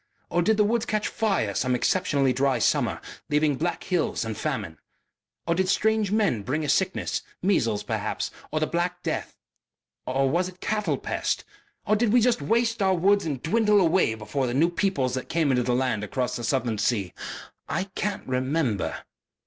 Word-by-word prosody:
Or 175 - +2
did 220 +4 +2
the 210 - +5
woods 230 +2 0
catch 215 0 0
fire 195 - 0
some 125 +5 +1
exceptionally 140 -2 +2
dry 135 +1 +2
summer, - - +1 0.3
leaving 150 -1 +2
black 170 +6 -2
hills 175 -9 0
and 110 -1 -3
famine? - - -3 0.7
Or 170 - +2
did 185 +2 0
strange 215 0 +2
men 205 - +2
bring 150 +9 -2
a - - -3
sickness 190 0 0 0.2
measles, 115 - +1
perhaps, - - -2 0.2
or 155 - 0
the 155 - +1
black 175 +2 -2
death? - - -3 0.7
Or 135 +1 +1
was 175 +6 +1
it 185 0 -16
cattle 205 -10 -1
pest? - - -2 0.4
Or 215 - +3
did 220 0 +2
we 245 - +6
just 240 -6 +2
waste 230 +8 +1
our 190 -1 +3
woods 200 +1 +3
and 140 -5 -3
dwindle 210 +4 +3
away 165 - +3
before 110 +5 -2
the 120 - -2
new 165 +5 +3
peoples 175 -9 0
that 130 0 -4
came 160 -4 +2
into 125 -1 +2
the 125 0 +1
land 125 -5 0
across 125 +4 -2
the 120 - -5
southern 120 -5 0
sea? 105 -5 0 0.6
I - - 0
can't 205 +1 -3
remember...." 130 - -1
160 Hz, 180 wpm, -26 LUFS, 130-200 Hz, 0.7 s, we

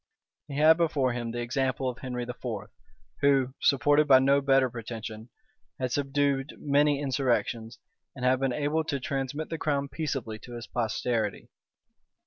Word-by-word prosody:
He 140 -2 -6
had 155 +2 +6
before 145 -7 +1
him 120 -1 -3
the 120 +1 -3
example 130 +2 -1
of 125 0 -4
Henry 125 -2 -4
IV., 125 0 -8 0.8
who, 135 -2 +3
supported 145 +3 +4
by 135 -2 +8
no 140 +2 +4
better 135 -1 +4
pretension, 115 -1 -7 0.5
had 130 -2 -1
subdued 140 0 0
many 145 0 +2
insurrections, 125 -4 -1 0.4
and 130 -2 -4
had 130 0 +3
been 135 -1 +1
able 150 +4 0
to 140 -3 -2
transmit 135 +3 -3
the 165 - -4
crown 140 -2 -1
peaceably 135 -9 -3
to 120 - -11
his 120 0 -6
posterity. 115 -2 -2
135 Hz, 150 wpm, -28 LUFS, 120-145 Hz, 0.8 s, by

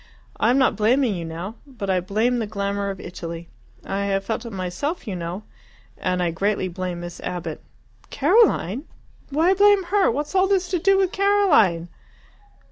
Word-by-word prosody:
I 225 - +2
am 250 - +4
not 260 - +3
blaming 235 +2 +2
you 170 -3 -4
now. 170 +7 -6
But 220 -8 -4
I 185 - +2
blame 220 +7 0
the 220 - -2
glamour 200 -1 -2
of 195 -1 -5
Italy 170 -1 -7 0.4
I 200 +1 -2
have 195 -1 -1
felt 230 +1 -3
it - - -7
myself, 195 - -4
you 195 - -3
know 175 +4 -5 0.5
and 180 -1 -1
I 170 - 0
greatly 195 +2 0
blame 180 0 -4
Miss 175 0 -8
Abbott." 170 -3 -5 0.5
"Caroline! 295 - +2 0.4
Why 320 +6 +3
blame 405 0 +5
her? 385 +2 +2
What's 290 +5 -3
all 380 0 +4
this 380 -2 +1
to 360 -1 0
do 390 +3 +4
with 380 -2 +2
Caroline?" 370 - +3
210 Hz, 175 wpm, -23 LUFS, -, 0.5 s, blame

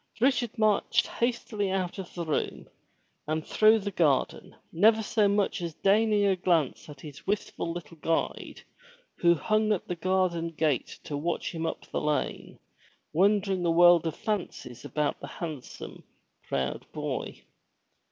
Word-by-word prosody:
Richard 245 -2 +1
marched 215 -2 +2
hastily 235 -4 -2
out 190 0 -2
of 185 - -8
the 170 -1 -3
room 155 - -2 0.6
and 155 0 -2
through 215 +1 +5
the 205 -1 -4
garden, 155 -7 0 0.2
never 220 +6 +4
so 210 -1 +2
much 200 -2 +1
as 170 -2 -4
deigning 210 +1 +3
a 195 -1 +3
glance 170 -6 0
at 145 -2 -11
his 150 +1 -11
wistful 195 -4 -2
little 165 -1 -8
guide, 165 +1 -2 0.5
who 170 0 +4
hung 215 +5 +1
at 205 - -1
the 180 - -2
garden 175 -1 0
gate 150 -6 0
to 150 - -5
watch 165 +4 -2
him 165 -1 -3
up - - -5
the - - -1
lane, 150 0 -2 0.6
wondering 195 +1 +2
a 170 - +2
world 170 0 +6
of 160 - -3
fancies 200 - -4
about 150 -1 -1
the 140 - -7
handsome, 150 -2 -7 0.5
proud 65 -1 -3
boy. - - -4
175 Hz, 150 wpm, -28 LUFS, 160-205 Hz, 0.6 s, world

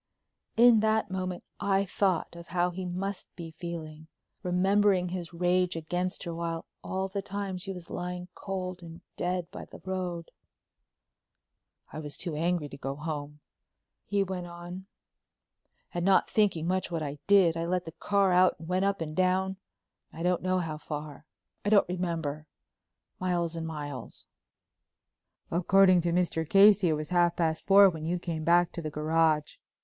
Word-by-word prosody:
In 235 -1 +7
that 220 -1 +1
moment 185 -1 -3 0.2
I 200 0 +2
thought 185 -3 0
of 170 0 -10
how 175 +1 +1
he 185 +1 -5
must 185 +2 -4
be 165 -2 -7
feeling, 160 -2 -7 0.3
remembering 190 0 +2
his 175 -2 -5
rage 180 +1 +1
against 180 +3 -2
her 170 -3 -4
while 165 0 -3 0.2
all 190 0 -2
the 195 +1 -3
time 195 -1 -4
she 195 +2 -3
was 180 -3 -9
lying 180 0 -4
cold 185 -2 -5
and 165 0 -11
dead 180 -1 -2
by - - -8
the - - -12
road. 180 -3 -4 1.6
"I - - -5
was 150 -2 -6
too 170 -4 -4
angry 165 0 0
to 140 - -9
go 135 0 -4
home," 150 -1 -5 0.7
he 200 0 +2
went 185 -2 -5
on, 175 +2 -9 1.1
"and 175 - -2
not 190 +1 +4
thinking 200 -7 +2
much 185 +1 0
what 165 -3 -2
I 145 0 -5
did, 195 -5 +5
I 165 0 -2
let 180 +1 -1
the 165 - -7
car 200 +2 +1
out 180 +1 +5
and 160 - -10
went 185 +2 +1
up 200 -3 0
and 155 -1 -4
down—I 185 -2 -3
don't 180 0 +1
know 185 0 +1
how 160 -4 -3
far—I 150 +5 -7
don't 205 -2 +5
remember—miles 170 +1 -4
and 165 -1 -4
miles." 145 -6 -6 1.3
"According 185 +1 +5
to 170 0 0
Mr. 170 -2 0
Casey 200 -2 +6
it - - +3
was 150 0 -3
half 175 -1 +3
past 160 -2 -1
four 200 0 +8
when 160 -2 -7
you 170 +3 0
came 165 -2 -4
back 175 +2 +4
to 170 - -6
the 155 - -3
garage." 155 0 +1
175 Hz, 160 wpm, -29 LUFS, 165-185 Hz, 1.6 s, four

